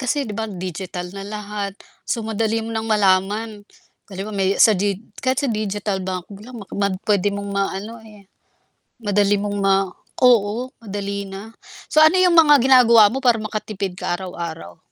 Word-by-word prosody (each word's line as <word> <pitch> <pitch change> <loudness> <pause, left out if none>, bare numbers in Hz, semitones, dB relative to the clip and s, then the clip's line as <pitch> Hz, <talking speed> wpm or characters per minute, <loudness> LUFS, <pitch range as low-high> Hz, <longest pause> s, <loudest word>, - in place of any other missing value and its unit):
kasi, 270 +1 -1
'di 210 - -6
ba, 220 0 -4
digital 180 -1 -6
na 195 - -6
lahat, 205 -1 -5 0.3
so 230 - -2
madali 225 +1 0
mo 230 - -6
nang 220 0 -3
malaman. 205 +2 +1 0.5
Halimbawa, 195 +2 -6
may 190 -1 +1
sa 220 - +7
dig 200 0 -1 0.2
kahit 260 +2 +1
sa 280 - -1
digital 205 -2 -2
bank 185 -1 -5 0.2
lang 250 0 -10 0.2
mad 200 -1 0
puwede 205 -1 +2
mong 200 0 -5
maano, 200 +3 -3
eh, 210 -3 -16 0.8
madali 205 0 +2
mong 205 0 -3
ma 195 -1 +3 0.5
oo, 240 +1 +3
madali 200 -1 -4
na. 195 +3 -9 0.4
So, 310 - +4
ano 315 +4 +6
'yong 360 -2 +4
mga 295 -3 +7
ginagawa 235 -5 +6
mo - - -2
para 240 -3 +4
makatipid 210 -3 -4
ka - - -2
araw-araw? 170 - -7
205 Hz, 165 wpm, -21 LUFS, 195-225 Hz, 0.8 s, sa